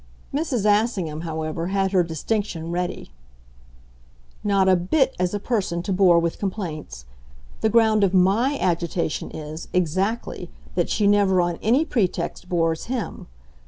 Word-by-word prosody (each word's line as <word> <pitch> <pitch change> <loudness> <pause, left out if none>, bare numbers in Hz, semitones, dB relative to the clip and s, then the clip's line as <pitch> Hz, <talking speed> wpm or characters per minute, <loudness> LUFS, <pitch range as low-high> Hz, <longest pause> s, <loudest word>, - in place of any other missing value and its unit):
Mrs. 275 -8 -1
Assingham, 205 -7 +1
however, 160 0 -3
had 195 0 0
her 185 -2 +4
distinction 170 0 -3
ready. 175 - -3 1.3
"Not 195 -2 +2
a 190 - +6
bit 260 - +1
as 180 +2 0
a - - -1
person 190 -7 -1
to 195 - -1
bore 180 -2 +5
with 170 0 0
complaints. 160 - -5 0.5
The 220 - +2
ground 220 -2 +4
of 195 - +3
MY 200 +9 +3
agitation 170 -2 -1
is, 155 +1 -7
exactly, 185 +6 -1 0.2
that - - 0
she 210 - +1
never 200 -2 +4
on 175 -1 0
any 255 +8 +3
pretext 195 - -2
bores 165 -2 0
him. 245 -3 -4
185 Hz, 140 wpm, -23 LUFS, 170-210 Hz, 1.3 s, a